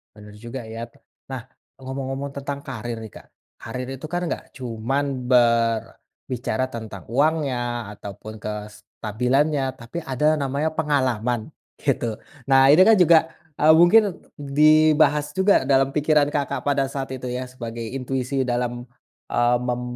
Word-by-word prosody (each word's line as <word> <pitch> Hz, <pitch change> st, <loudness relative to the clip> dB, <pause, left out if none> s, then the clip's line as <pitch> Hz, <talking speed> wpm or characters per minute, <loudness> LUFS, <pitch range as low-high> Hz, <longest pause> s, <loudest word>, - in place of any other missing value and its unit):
Bener 105 Hz, -1 st, -13 dB
juga 120 Hz, +3 st, -7 dB
ya. 115 Hz, +1 st, -5 dB, 0.5 s
Nah 130 Hz, -, -4 dB, 0.4 s
ngomong-ngomong 135 Hz, +1 st, -4 dB
tentang 140 Hz, 0 st, -4 dB
karier 115 Hz, -2 st, -6 dB
nih 110 Hz, -, -8 dB
Kak, -, -, -15 dB, 0.3 s
karier 125 Hz, +3 st, -6 dB
itu 145 Hz, -, -8 dB
kan 175 Hz, +3 st, -3 dB
nggak -, -, -6 dB
cuman 130 Hz, +2 st, -3 dB
berbicara 120 Hz, +1 st, 0 dB
tentang 110 Hz, -5 st, -8 dB
uangnya 125 Hz, -5 st, 0 dB
ataupun 105 Hz, +2 st, -9 dB
kestabilannya 125 Hz, +6 st, -2 dB
tapi 130 Hz, +7 st, -8 dB
ada 150 Hz, +4 st, +1 dB
namanya 140 Hz, +2 st, -1 dB
pengalaman 130 Hz, -7 st, -1 dB, 0.3 s
gitu. 120 Hz, -5 st, -1 dB, 0.2 s
Nah 135 Hz, 0 st, +5 dB
ini 155 Hz, +6 st, +7 dB
kan 225 Hz, -, +7 dB
juga, 170 Hz, -4 st, +6 dB, 0.3 s
eee, 155 Hz, +1 st, +6 dB
mungkin 180 Hz, +4 st, +5 dB, 0.2 s
dibahas 150 Hz, +1 st, +4 dB
juga 190 Hz, -6 st, +3 dB
dalam 135 Hz, 0 st, +3 dB
pikiran 150 Hz, 0 st, +2 dB
Kakak 145 Hz, -2 st, -2 dB
pada 140 Hz, -1 st, +1 dB
saat 135 Hz, 0 st, -5 dB
itu 130 Hz, -1 st, -6 dB
ya 125 Hz, +1 st, -4 dB
sebagai 120 Hz, -2 st, -7 dB
intuisi 130 Hz, +2 st, -2 dB
dalam, 120 Hz, 0 st, -2 dB, 0.5 s
eee, 120 Hz, 0 st, +3 dB
mem 125 Hz, 0 st, -2 dB
130 Hz, 130 wpm, -23 LUFS, 120-145 Hz, 0.5 s, ini